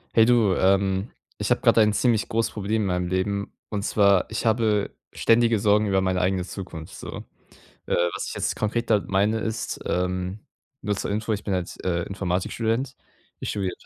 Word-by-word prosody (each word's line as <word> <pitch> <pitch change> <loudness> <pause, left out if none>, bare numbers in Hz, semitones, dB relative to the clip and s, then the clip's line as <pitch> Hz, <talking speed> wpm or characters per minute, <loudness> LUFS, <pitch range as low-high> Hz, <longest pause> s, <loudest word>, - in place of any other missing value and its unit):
Hey 115 - +7
du, 115 -5 +4
ähm, 95 +2 +2 0.3
ich - - -2
habe - - +2
gerade 115 - +5
ein 105 0 +4
ziemlich 110 +1 +1
großes 115 0 0
Problem 105 +1 -1
in - - -1
meinem 90 -1 -1
Leben. 100 +2 -1 0.2
Und 105 -2 -2
zwar, 100 -2 +3
ich 110 +1 -3
habe 110 -2 +1 0.2
ständige 115 0 +3
Sorgen 105 +1 +3
über 95 -1 +2
meine 95 -1 0
eigene 90 0 +1
Zukunft 90 -4 -8
so. - - -7 0.6
Äh, - - 0 0.2
was - - -4
ich - - -5
jetzt - - -2
konkret 115 +2 -1
damit 105 -3 +2
meine 100 +3 +2
ist, 110 0 -3
ähm 90 +2 -1 0.4
nur 105 -1 -1
zur - - -3
Info, 110 +2 -1
ich 105 -1 -3
bin 100 - -1
halt, 90 -1 -3
äh, 85 -2 0
Informatikstudent. 110 +8 -2 0.4
Ich - - -4
studiere 95 -3 -2
100 Hz, 185 wpm, -25 LUFS, 95-110 Hz, 0.6 s, Hey